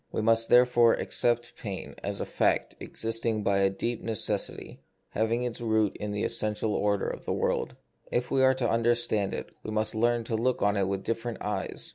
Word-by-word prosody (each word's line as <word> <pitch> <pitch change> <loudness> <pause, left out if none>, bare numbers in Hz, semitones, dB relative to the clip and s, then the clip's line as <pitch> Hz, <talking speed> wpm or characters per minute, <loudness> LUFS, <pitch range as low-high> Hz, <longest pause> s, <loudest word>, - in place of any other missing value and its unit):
We - - -2
must, 115 +1 +3
therefore, 120 -1 +5
accept 120 0 0
pain 100 -4 -6
as - - -4
a - - -2
fact - - +1
existing 115 -1 -2
by 100 -1 +2
a 95 0 +4
deep 115 +4 -3
necessity, 110 -2 -2 0.3
having 115 +2 0
its 120 -1 -3
root 110 -3 +1
in 105 - -5
the 105 0 -2
essential 110 -1 0
order 100 -1 0
of - - -6
the - - -1
world. - - -1 0.4
If 120 0 -1
we 135 - +3
are 130 0 +5
to 125 -2 0
understand 115 -3 +1
it, - - -6
we - - -7
must 110 0 -1
learn 120 +1 +1
to 115 0 -3
look 120 +3 0
on 100 0 +3
it 100 -2 +1
with 95 0 -2
different 115 0 -3
eyes. 105 0 -3
115 Hz, 195 wpm, -28 LUFS, 105-120 Hz, 0.4 s, therefore